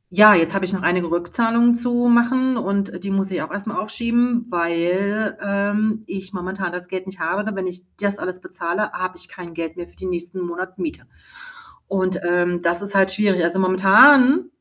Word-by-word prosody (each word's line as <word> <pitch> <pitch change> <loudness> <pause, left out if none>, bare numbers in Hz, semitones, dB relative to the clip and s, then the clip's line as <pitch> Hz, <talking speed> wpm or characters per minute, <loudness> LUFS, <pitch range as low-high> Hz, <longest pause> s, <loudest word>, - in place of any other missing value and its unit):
ja, 210 +1 +9
jetzt 165 -1 +2
habe 195 -1 -1
ich 185 - -5
noch 185 - -3
einige 175 -1 +1
Rückzahlungen 230 +8 +2
zu 240 0 0
machen 255 +2 +3
und 200 -4 -3
die 200 - -4
muss 195 0 -1
ich 180 - -2
auch 155 - -6
erstmal 205 +2 -5
aufschieben, 235 +2 0
weil, 180 +5 -1
ähm, 205 +2 -1
ich 190 +1 -7
momentan 185 0 -4
das 180 0 -7
Geld 185 0 -6
nicht 190 +1 -9
habe. 170 +6 -1
Und 210 - -6
wenn 190 -1 -3
ich 180 0 -7
das 200 0 -2
alles 185 0 -5
bezahle, 180 +3 -4
habe 185 0 -5
ich 185 +1 -8
kein 175 -3 -11
Geld 165 -1 -5
mehr 175 -1 -8
für - - -25
die - - -9
nächsten 175 0 -5
Monat 180 +2 -6
Miete. 315 -3 -6 0.8
Und, 185 -1 -1
ähm, 175 0 0
das 170 0 0
ist 200 0 -6
halt 190 -1 +3
schwierig. 195 -2 +1
Also, 170 +3 0
momentan, 245 - +6
190 Hz, 195 wpm, -20 LUFS, 180-215 Hz, 0.8 s, ja